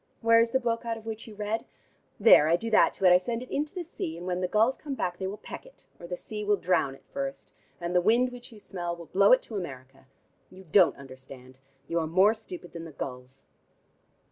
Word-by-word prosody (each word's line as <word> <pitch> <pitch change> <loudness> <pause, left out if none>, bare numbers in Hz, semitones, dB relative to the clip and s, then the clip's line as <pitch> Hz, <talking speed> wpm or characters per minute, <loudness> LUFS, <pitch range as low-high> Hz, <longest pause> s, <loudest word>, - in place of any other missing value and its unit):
Where 230 0 +5
is 230 0 +3
the 260 - +1
book 230 -2 -1
out 230 -1 -3
of 220 - -13
which 225 0 -6
you 215 - -11
read? 210 +2 -2 0.6
There, 200 -8 +7
I 165 - +4
do 225 +6 -4
that 215 - +5
to 195 - -3
it: 180 - +8
I - - +8
send 230 +6 -3
it 255 - -13
into 295 +5 -2
the 360 - -3
sea, 170 - -6
and 175 - -8
when 180 0 -2
the 180 - 0
gulls 220 +7 +3
come 285 -3 -6
back 175 -7 -3
they 190 - -2
will 200 +2 -5
peck - - -9
it, - - -17
or 170 - -9
the 180 0 -4
sea 210 +2 -6
will 205 0 +3
drown 170 -8 0
it - - -21
first, 275 0 -5 0.3
and 175 0 -3
the 180 - +5
wind 235 +6 +3
which 245 -1 -11
you 220 - -13
smell 175 -4 -5
will 170 -1 -11
blow 200 +4 +4
it 255 - +6
to 220 - -6
America. 135 -6 -8 0.4
You 190 +1 -14
don't 190 -4 +5
understand: 130 -1 -13 0.3
you 170 - 0
are 160 - -2
more 190 +6 +4
stupid 185 -6 -9
than 165 -1 -7
the 165 - -9
gulls." 130 -1 -8
195 Hz, 245 wpm, -28 LUFS, 170-230 Hz, 0.6 s, it